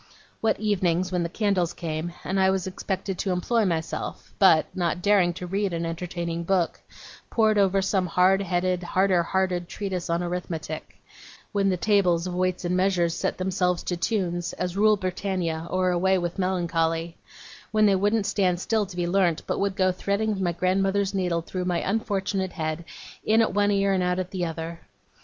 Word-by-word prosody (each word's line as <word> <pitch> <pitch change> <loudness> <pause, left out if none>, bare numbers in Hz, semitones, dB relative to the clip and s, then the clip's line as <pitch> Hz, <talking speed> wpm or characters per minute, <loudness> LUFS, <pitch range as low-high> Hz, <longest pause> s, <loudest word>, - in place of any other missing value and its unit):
What 225 - +1
evenings, 185 -4 +1
when 180 -1 0
the 170 - -1
candles 190 -3 0
came, 165 0 -4
and 190 +1 -1
I 190 0 +4
was 190 -1 0
expected 190 0 -4
to 195 - -1
employ 215 +5 +1
myself, 165 -3 -3
but, 180 -5 +6
not 175 -1 0
daring 200 -4 +4
to 180 +1 -6
read 195 +1 -1
an 170 0 -2
entertaining 170 0 -4
book, 180 -1 0 0.5
pored 215 -2 +3
over 195 -1 +3
some 190 -1 +1
hard 185 +3 +3
headed, 180 -1 0
harder 185 0 +2
hearted 180 0 -1
treatise 190 -4 -4
on 170 +1 0
arithmetic; 170 -3 -5 0.5
when 200 -1 +2
the 185 - +1
tables 180 -4 +2
of 180 - -4
weights 185 0 -1
and 175 +1 0
measures 185 -3 +2
set - - -2
themselves 180 -1 0
to 180 - -2
tunes, 175 -3 -1
as 180 0 -3
'Rule 215 +1 +4
Britannia', 185 -3 -2
or 185 0 +1
'Away 190 +2 +2
with 175 +1 -3
Melancholy'; 165 -2 0 0.6
when 215 -1 +4
they 200 -2 +5
wouldn't 205 +2 +1
stand 180 -4 +1
still 215 +1 0
to 185 - -10
be 175 - 0
learnt, 175 -2 +1
but - - -2
would 200 -1 0
go 185 -2 +3
threading 200 +2 -1
my 175 -2 +1
grandmother's 195 +3 +1
needle 180 -3 0
through 180 +1 -4
my 180 -1 0
unfortunate 195 -2 -1
head, 160 -1 -3 0.4
in 220 +1 +3
at 225 - +2
one 205 0 +3
ear 200 -1 +2
and 185 - +1
out 180 0 +1
at 185 0 -3
the 180 -2 -2
other! 165 0 -5
185 Hz, 185 wpm, -25 LUFS, 175-195 Hz, 0.6 s, but